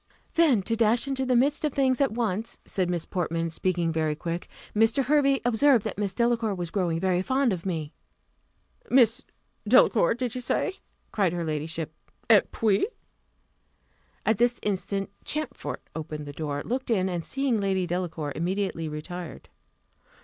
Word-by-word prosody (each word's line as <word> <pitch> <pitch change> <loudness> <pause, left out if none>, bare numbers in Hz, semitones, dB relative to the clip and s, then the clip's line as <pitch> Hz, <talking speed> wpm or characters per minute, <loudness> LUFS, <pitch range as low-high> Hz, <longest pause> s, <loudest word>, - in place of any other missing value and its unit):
"Then 290 - +4
to 230 - 0
dash 230 +3 +3
into 265 -1 -1
the 255 - +3
midst 280 +5 +2
of 300 -3 0
things 260 -1 +2
at 275 - +3
once," 220 -2 -2
said 185 -2 -1
Miss 175 -2 -2
Portman, 165 -2 -2
speaking 170 0 0
very 155 -1 0
quick: 170 +2 -4 0.3
"Mr. 225 +5 +3
Hervey 275 0 +3
observed 245 0 +4
that - - -4
Miss 200 -2 0
Delacour 235 0 +1
was 175 -2 -4
growing 175 -5 0
very 185 0 +1
fond 260 +2 +1
of 180 +1 -5
me." 160 -4 -3 1.0
"Miss 245 0 +4 0.4
Delacour, 230 -4 +5
did 245 -1 -3
you 255 - -4
say?" 380 +9 -1 0.3
cried 195 -5 +1
her 175 -1 -2
ladyship: 155 +1 -3 0.4
"Et 210 -3 +5
puis?" 215 - +2 1.4
At 220 -1 +2
this 240 0 +2
instant 195 0 -2
Champfort 305 +1 -4
opened 155 -2 -5
the 145 - -7
door, 145 -1 -3
looked 255 +2 -3
in, 190 -5 +2
and 175 -2 -2
seeing 270 -1 0
Lady 190 -2 0
Delacour, 170 -4 -3
immediately 175 -1 -2
retired. 170 +3 -7
195 Hz, 155 wpm, -27 LUFS, 170-245 Hz, 1.4 s, Delacour